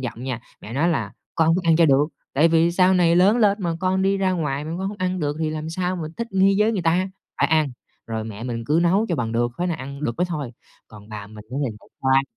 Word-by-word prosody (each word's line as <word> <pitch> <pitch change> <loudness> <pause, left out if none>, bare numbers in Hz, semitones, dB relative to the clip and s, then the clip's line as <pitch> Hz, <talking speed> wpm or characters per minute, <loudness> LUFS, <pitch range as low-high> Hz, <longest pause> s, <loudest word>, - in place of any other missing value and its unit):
giọng 120 -1 -5
nha. 125 -3 -3 0.2
Mẹ 110 - -9
nói 155 +6 +2
là 165 - -1 0.2
"Con 160 0 +3
phải 180 - 0
ăn 160 - +5
cho 165 -1 +5
được, 140 +2 +4 0.2
tại 155 +4 +4
vì 165 +1 +3
sau 185 +1 +4
này 175 -2 +4
lớn 200 +6 +5
lên 210 -2 +3
mà 170 -2 -1
con 190 +1 +1
đi 195 +1 +2
ra 190 -1 +1
ngoài 150 -5 -2
mà 155 - -6
con 190 - -2
hông 205 - -7
ăn 185 0 -1
được 145 -1 -1
thì 155 - 0
làm 155 +1 -4
sao 180 +2 -2
mà 170 - -4
thích 235 0 -4
nghi 195 +1 +4
với 215 +2 +3
người 195 - -1
ta, 180 +3 +2 0.3
phải 140 - +5
ăn!", 155 -2 +3 0.4
rồi 110 -1 -3
mẹ 110 0 -7
mình 115 -2 -4
cứ 155 +3 +3
nấu 195 +6 +3
cho 170 - 0
bằng 115 -2 -2
được, 120 +1 +1
tới 180 - 0
nào 170 - -1
ăn 140 +2 -7
được 120 - 0
mới 180 - +1
thôi. 150 -8 -4 0.4
Còn 105 -1 -14
bà 105 -2 -7
mình 105 0 -12
á 130 - -5
thì 130 - -1
lại - - -20
xoa, 135 0 +4
160 Hz, 280 wpm, -23 LUFS, 135-185 Hz, 0.4 s, ăn